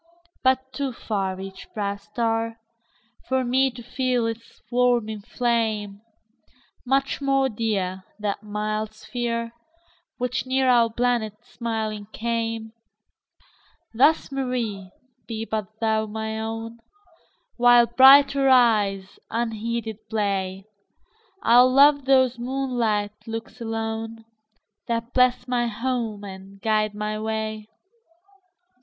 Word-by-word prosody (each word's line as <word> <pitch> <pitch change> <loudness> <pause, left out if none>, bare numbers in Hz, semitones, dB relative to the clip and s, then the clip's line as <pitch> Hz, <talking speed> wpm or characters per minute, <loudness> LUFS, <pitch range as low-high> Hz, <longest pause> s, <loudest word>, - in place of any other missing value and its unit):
But 260 0 +1
too 275 -3 -2
farEach 190 -3 -4
proud 200 -1 -2
star, 225 +1 -2 0.7
For 260 0 +2
me 260 +2 +2
to 245 -1 -11
feel 250 -1 0
its 230 0 -6
warming 240 -4 +1
flame; 220 -3 -1 0.8
Much 270 +2 0
more 270 -1 +2
dear, 200 -5 -2
That 205 -1 -3
mild 215 +1 -3
sphere, 230 +1 -3 0.6
Which 250 +1 -2
near 260 0 +2
our 240 -2 +5
planet 235 -3 0
smiling 220 -4 -4
came; 225 -1 -2 1.2
Thus, 280 +6 +3
Mary, 240 -8 -3 0.4
be 225 -1 -4
but 215 -3 -3
thou 220 -1 +1
my 220 +1 -4
own; 225 +1 -5 0.8
While 245 0 +6
brighter 270 +3 +7
eyes 210 -6 +3
unheeded 225 -1 -3
play, 195 -3 -1 0.8
I'll 245 +2 +6
love 285 +1 +6
those 260 -2 +3
moonlight 240 -5 -1
looks 225 +2 -7
alone, 225 0 -4 0.6
That 230 +1 -2
bless 250 0 +3
my 245 -1 +1
home 230 -2 -3
and 195 0 -10
guide 215 0 +1
my 210 0 -3
way. 220 0 -3
225 Hz, 105 wpm, -24 LUFS, 215-245 Hz, 1.2 s, brighter